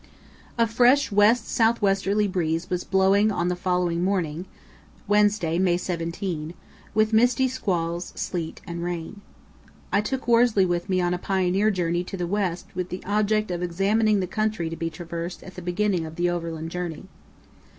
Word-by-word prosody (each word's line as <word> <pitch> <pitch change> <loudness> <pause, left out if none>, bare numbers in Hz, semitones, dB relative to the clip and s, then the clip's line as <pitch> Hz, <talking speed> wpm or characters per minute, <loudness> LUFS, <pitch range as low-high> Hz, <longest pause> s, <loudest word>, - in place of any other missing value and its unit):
A 230 - +4
fresh 245 +4 +3
west 215 +3 +4
south 230 0 +2
westerly 200 +1 +1
breeze 170 -2 -2
was 180 0 -1
blowing 195 +3 +3
on 175 -3 0
the 180 - 0
following 180 -1 0
morning 180 -3 -1 0.6
(Wednesday, 205 -5 +2
May 180 -2 +3
17), 170 -2 -4 0.4
with 215 0 +2
misty 245 +3 +4
squalls, 175 -9 -2
sleet, 165 -3 -4
and 170 0 -5
rain. 175 +3 -5 0.7
I 200 - +4
took 265 +4 -4
Worsley 230 -4 +4
with 175 +1 -2
me 185 -1 +2
on 175 0 +1
a 180 - -2
pioneer 190 +2 +1
journey 175 -3 0
to 195 - -6
the 175 - -2
west 185 -2 -1
with 180 -1 -3
the 180 - -6
object 215 0 +1
of 175 0 -3
examining 200 +4 +2
the - - -1
country 215 -4 -2
to - - -4
be 165 0 -3
traversed 170 +2 -6
at 190 - -11
the 180 - -8
beginning 180 -1 0
of 160 - -10
the 175 +1 +1
overland 165 -2 -4
journey. 175 -3 -5
185 Hz, 170 wpm, -25 LUFS, 175-210 Hz, 0.7 s, A